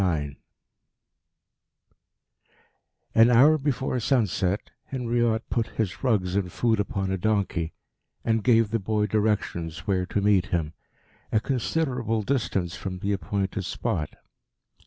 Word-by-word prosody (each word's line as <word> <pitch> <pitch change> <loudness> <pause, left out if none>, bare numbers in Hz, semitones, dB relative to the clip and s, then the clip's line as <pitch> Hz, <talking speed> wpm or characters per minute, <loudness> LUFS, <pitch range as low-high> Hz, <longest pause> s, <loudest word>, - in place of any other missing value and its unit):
IX 75 -6 0 2.8
An 115 +1 +6
hour 140 +6 +6
before 130 -2 -1
sunset 105 -6 0
Henriot 120 -3 0
put 115 -2 +1
his 105 -1 -3
rugs 100 -8 +1
and 95 -3 0
food 115 +1 +1
upon 95 -1 -1
a 95 - -1
donkey, 95 -5 0 0.5
and 110 -2 +1
gave 115 -3 +4
the 115 - +1
boy 105 +1 0
directions 95 -6 -1
where 95 -2 0
to 105 - -1
meet 100 -3 +3
him 80 -3 -1 0.6
a 110 - +3
considerable 125 -3 -1
distance 100 -8 -1
from 95 -2 -5
the 100 +3 -1
appointed 100 0 -2
spot. 75 -3 -2
105 Hz, 120 wpm, -26 LUFS, 95-115 Hz, 2.8 s, An